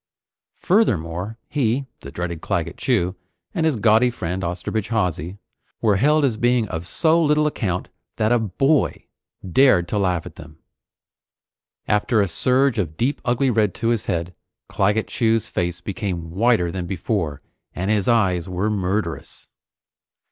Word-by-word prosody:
Furthermore, 100 - 0
he, 135 -1 0
the 70 - -9
dreaded 85 -1 -4
Claggett 85 -5 -2
Chew, 95 -8 0 0.4
and 165 -5 +1
his 155 - +1
gaudy 110 +2 +4
friend 95 -5 -4
Osterbridge 90 +5 -3
Hawsey, 90 -4 -1 0.4
were 105 -3 +2
held 150 +6 +3
as 120 -5 0
being 120 -1 +2
of 80 +2 -5
so 165 - +2
little 150 0 +3
account 95 -11 -2 0.3
that 110 +1 +1
a 120 - +4
boy 135 - +1 0.4
dared 95 -3 +4
to 105 - 0
laugh 90 -4 0
at - - -11
them! 75 - -12 1.3
After 105 +2 +2
a 100 - +3
surge 130 +5 +1
of 80 -5 -3
deep 135 +4 0
ugly 125 +2 +1
red 105 -4 +1
to 115 - -1
his 115 -3 0
head, 85 +1 -2 0.3
Claggett 105 +3 +1
Chew's 115 -2 0
face 85 -1 -2
became 95 -6 -4
whiter 100 -2 +2
than 90 -1 -4
before, 85 - -2 0.3
and 95 +4 -1
his 105 -3 +1
eyes 95 -7 +2
were 95 +4 -1
murderous. 95 -3 -3
105 Hz, 150 wpm, -22 LUFS, 90-120 Hz, 1.3 s, gaudy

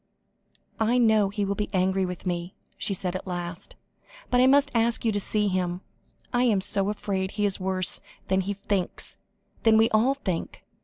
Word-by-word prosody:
"I 225 +3 +2
know 220 -4 +4
he 205 0 -2
will 200 - 0
be 205 +1 -3
angry 190 0 +1
with 180 +1 -7
me," 175 0 -3 0.2
she 195 - -2
said 180 -1 -3
at 185 - -5
last, 175 -1 -4 0.6
"but 250 0 +4
I 255 - +6
must 285 +1 +4
ask 230 0 +1
you 225 - +3
to 205 - 0
see 210 +1 0
him. 180 -1 -1 0.5
I 245 - +3
am 215 -5 +3
so 195 +1 +2
afraid 195 -2 -2
he 210 - 0
is 200 -1 +1
worse 185 -1 0 0.3
than 190 0 +2
he 200 +2 -3
thinks, 195 -2 -3 0.4
than 225 -1 +5
we 225 +1 +4
all 235 +6 +3
think. 185 -11 -4
200 Hz, 190 wpm, -26 LUFS, 185-220 Hz, 0.6 s, I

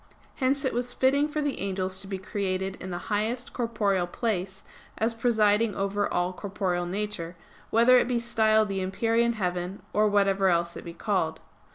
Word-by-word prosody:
Hence 270 +1 +1
it 265 - 0
was 245 +1 -2
fitting 280 +3 +3
for 300 0 -2
the 290 -2 -2
angels 190 -1 -2
to 195 - -8
be 195 -1 -3
created 190 -1 -2
in 185 - -6
the 175 - -3 0.2
highest 230 +4 -1
corporeal 210 -6 0
place, 190 -2 -3 0.3
as 225 +2 +1
presiding 220 -2 +2
over 200 +1 -1
all 180 +1 0
corporeal 180 -2 -2
nature; 190 -3 -4 0.3
whether 240 +3 +6
it - - +1
be 245 -1 +1
styled 220 -2 +3
the 195 -1 -2
empyrean 230 +5 +1
heaven, 180 -2 -3
or 215 +1 +4
whatever 195 -2 +3
else 170 -1 +1
it - - -8
be 170 0 -8
called. 165 -7 -1
205 Hz, 175 wpm, -27 LUFS, 185-230 Hz, 0.3 s, whether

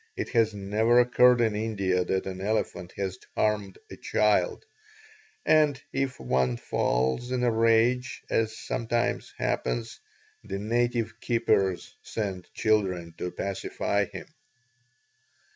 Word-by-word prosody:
It - - -3
has 115 -3 +3
never 110 +4 +2
occurred 125 0 +5
in 110 -2 +2
India 100 -4 0
that 95 +1 -1
an 95 -1 -5
elephant 95 -4 -2
has 95 -2 -3 0.2
harmed 105 -3 0
a - - -6
child, 105 - +1 0.8
and 150 -3 +4
if 135 -1 -1
one 65 -1 +1
falls 65 - 0
in 125 -1 0
a 120 - +3
rage, 115 +3 +2
as 110 -1 0
sometimes 120 0 -2
happens, 115 -1 -2 0.4
the - - -4
native 120 +2 -1
keepers 100 -6 +1
send 95 -5 -5
children 95 -6 +1
to 90 - -2
pacify 100 +2 -2
him." - - -9
110 Hz, 120 wpm, -27 LUFS, 95-120 Hz, 0.8 s, occurred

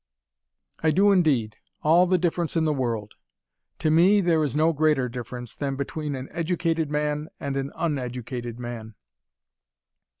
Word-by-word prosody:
"I 160 - +3
do 200 +5 +4
indeed, 140 - +2 0.3
all 170 +4 +5
the 185 +1 +3
difference 170 -1 -1
in 160 - +2
the 155 - +2
world 115 -6 -2 0.6
To 155 - +1
me, 180 +6 +5
there 170 -4 +2
is 145 -2 -2
no 160 +2 +3
greater 150 -4 +2
difference, 125 0 -7
than 140 -2 -2
between 145 +1 -3
an 130 0 -6
educated 165 -2 -1
man 150 +1 -1
and 140 -1 -3
an 135 0 -2
uneducated 125 -6 -3
man." 115 -3 -7
150 Hz, 145 wpm, -25 LUFS, 125-165 Hz, 0.6 s, all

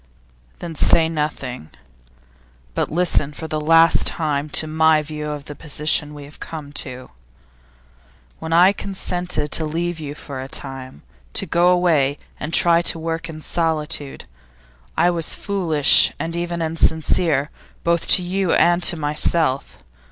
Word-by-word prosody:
'Then 170 -1 -7
say 160 +1 +3
nothing, 150 - -4 1.0
but - - -1
listen 165 -3 +2
for 160 +2 -7
the 155 -1 -3
last 165 +2 +4
time 150 -2 -2
to 155 - 0
my 155 0 +3
view 150 0 -6
of 145 -1 -6
the 150 - -7
position 150 0 -1
we 145 - -9
have 145 +2 -13
come 150 -3 -8
to. 130 -3 -5 1.3
When 160 - -6
I 180 +4 +6
consented 180 -6 -3
to 160 - +1
leave 165 +2 -3
you 145 -2 -6
for 140 -3 -8
a 130 - -7
time, 135 - -8 0.3
to - - +1
go 175 +1 +2
away 165 -6 +2 0.2
and 150 - -5
try 170 0 +5
to 170 - +1
work 165 +1 -4
in 155 -1 -8
solitude, 160 -3 -2 0.7
I 175 - +4
was 165 -2 -1
foolish 165 -8 +3
and 165 +1 -4
even 170 -1 -3
insincere, 160 -2 +1 0.3
both 170 0 +1
to 180 - +4
you 185 0 0
and 175 +1 +3
to 175 - +4
myself. 150 -1 +1
160 Hz, 145 wpm, -20 LUFS, 150-170 Hz, 1.3 s, I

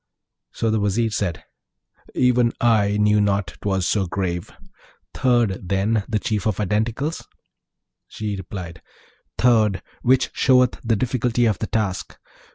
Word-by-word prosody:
So 115 - -1
the 110 - +1
Vizier 105 +3 0
said, 95 -5 -2 0.7
'Even 125 -2 +3
I 105 -3 +3
knew 105 0 +3
not 100 -4 -1
'twas 95 -3 0
so 100 -3 +1
grave! 90 -1 -3 0.6
Third, 115 -8 +1
then, 100 +2 +1
the 110 - +1
Chief 105 -1 -1
of 105 -4 0
Identicals?' 110 - -1 0.8
She 105 -1 -4
replied, 90 -3 -8 0.6
'Third! 110 -5 +3 0.2
which 130 +1 +2
showeth 125 -2 +3
the 115 -1 +1
difficulty 120 +1 0
of 110 -3 +1
the 110 - -3
task. 105 -4 -2
105 Hz, 130 wpm, -22 LUFS, 100-120 Hz, 0.8 s, Even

